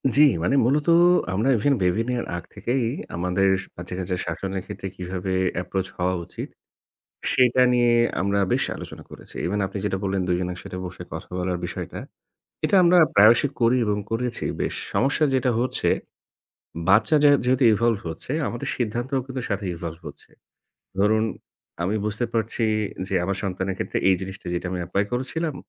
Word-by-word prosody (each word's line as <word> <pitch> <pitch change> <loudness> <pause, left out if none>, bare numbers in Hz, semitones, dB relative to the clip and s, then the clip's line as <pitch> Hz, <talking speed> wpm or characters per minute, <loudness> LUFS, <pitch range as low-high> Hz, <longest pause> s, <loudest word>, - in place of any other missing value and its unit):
জি, 145 - +6 0.2
মানে 110 - +2
মূলত 145 +5 +1 0.5
আমরা 110 +8 +1
even 140 +7 +2
baby 90 +5 +2
নেয়ার 125 -1 -1
আগ 85 - -5
থেকেই 125 0 -1 0.3
আমাদের 90 +3 +1 0.3
বাচ্চা-কাচ্চার 90 +1 -4
শাসনের 95 +3 -3
ক্ষেত্রে 95 - -6
কিভাবে 95 +1 -4 0.3
approach 95 +1 -3
হওয়া 90 +1 +1
উচিত, - - -7 0.8
সেটা 125 0 +4
নিয়ে 120 -1 +4 0.3
আমরা 100 +1 +1
বেশ - - +2
আলোচনা - - -9
করেছি। - - -13
Even 100 +4 -1
আপনি 95 +2 -6
যেটা 95 -2 -1
বললেন 95 -1 0
দুইজন 90 0 0
একসাথে 90 +1 -8
বসে 90 - -7
কথা - - -7
বলার 90 0 -1
বিষয়টা, 85 - -6 0.7
এটা - - +2
আমরা 175 +1 +5 0.2
প্রায়শই 110 +7 +6
করি 120 +2 +4
এবং 105 -1 0
করেছি 120 +1 -2 0.2
বেশ। - - -2 0.2
সমস্যা 140 +3 +2
যেটা 125 -1 +2
হচ্ছে, 125 +2 0 1.0
বাচ্চা 110 +9 +5
য্যা 145 - +7
যেহেতু 130 +1 +3
evolve 115 -1 +1
হচ্ছে, 80 +9 -6 0.2
আমাদের 120 - -5
সিদ্ধান্তও 120 +3 -1
কিন্তু 130 -1 -5
সাথে 100 -1 -2
evolve 85 -1 -6
হচ্ছে। 70 -1 -12 0.7
ধরুন 110 +2 +3 0.6
আমি 100 +5 0
বুঝতে 105 +3 -1
পারছি 115 +1 -1 0.4
যে, 95 - -5
আমার 95 +2 -1
সন্তানের 95 0 -2
ক্ষেত্রে - - -3
এই 95 - +5
জিনিসটা 95 -1 -7
যেটা 85 - -3
আমি 90 - -3
apply 100 +4 0
করেছিলাম, 145 +5 -2
100 Hz, 160 wpm, -24 LUFS, 90-125 Hz, 1.0 s, য্যা